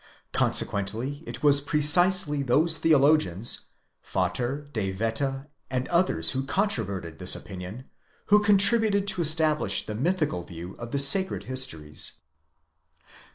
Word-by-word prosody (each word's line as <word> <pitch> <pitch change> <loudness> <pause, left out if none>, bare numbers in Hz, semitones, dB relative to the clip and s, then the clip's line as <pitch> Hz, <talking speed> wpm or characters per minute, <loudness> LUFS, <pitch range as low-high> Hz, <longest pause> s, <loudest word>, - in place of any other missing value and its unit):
Consequently 115 +9 0
it - - -8
was 145 -1 +4
precisely 150 +1 +4
those 150 +5 +2
theologians, 145 - +1 0.4
Vater, 135 +4 -3
De 100 -4 -3
Wette 125 +7 -3 0.2
and 130 0 -3
others 170 - 0
who 130 - -3
controverted 100 - -3
this 90 - +3
opinion, 95 +5 -9 0.5
who 210 - +7
contributed 205 0 +2
to 190 -2 -2
establish 155 - +2
the 105 - -6
mythical 150 - -2
view 85 +1 -10
of 120 0 -9
the - - -2
sacred 140 +8 +4
histories. 80 -13 -4
140 Hz, 115 wpm, -25 LUFS, 105-160 Hz, 0.5 s, who